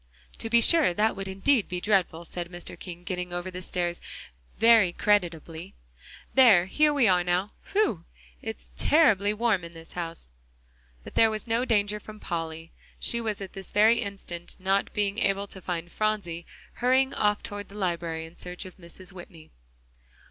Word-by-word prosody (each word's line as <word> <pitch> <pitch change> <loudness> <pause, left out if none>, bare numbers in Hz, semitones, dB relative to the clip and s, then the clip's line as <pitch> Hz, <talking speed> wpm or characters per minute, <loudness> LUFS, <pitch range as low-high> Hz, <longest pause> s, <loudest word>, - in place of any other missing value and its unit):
"To 225 - -3
be 235 +1 +5
sure; 305 - +5
that 215 +3 +2
would 195 -1 -5
indeed 200 +5 +1
be 180 - -2
dreadful," 180 -4 +1
said 175 0 -5
Mr. 175 -1 -7
King, 175 -1 -8
getting 180 -1 -4
over 175 +1 -4
the 180 0 -7
stairs 175 -1 -1 0.6
very 225 -5 +6
creditably. 170 - -1 0.6
"There, 225 -10 +7
here 300 +10 +3
we 280 -6 +3
are 180 -2 +4
now. 180 +4 0 0.2
Whew! 395 - +1 0.4
it's - - -6
terribly 210 - +4
warm 215 -4 +1
in 170 0 -9
this 165 0 -12
house!" 165 - -5 0.7
But - - -11
there 225 - +5
was 215 -1 -4
no 235 +2 0
danger 210 -3 +1
from 215 +1 -11
Polly; 165 -2 -5 0.3
she 235 - +1
was 215 -3 -3
at 195 - -7
this 195 -1 -5
very 220 +3 +5
instant, 195 -5 -6
not 195 +1 0
being 205 +1 -1
able 195 +1 +1
to 195 -1 -10
find 175 -1 -4
Phronsie, 205 -6 -2 0.3
hurrying 260 +2 +3
off 210 0 +1
toward 205 0 -7
the 200 - -13
library 170 -4 -2
in 165 +1 -14
search 180 +2 -6
of 185 - -11
Mrs. 180 +2 -11
Whitney. 175 -3 -12
195 Hz, 170 wpm, -27 LUFS, 175-215 Hz, 0.7 s, There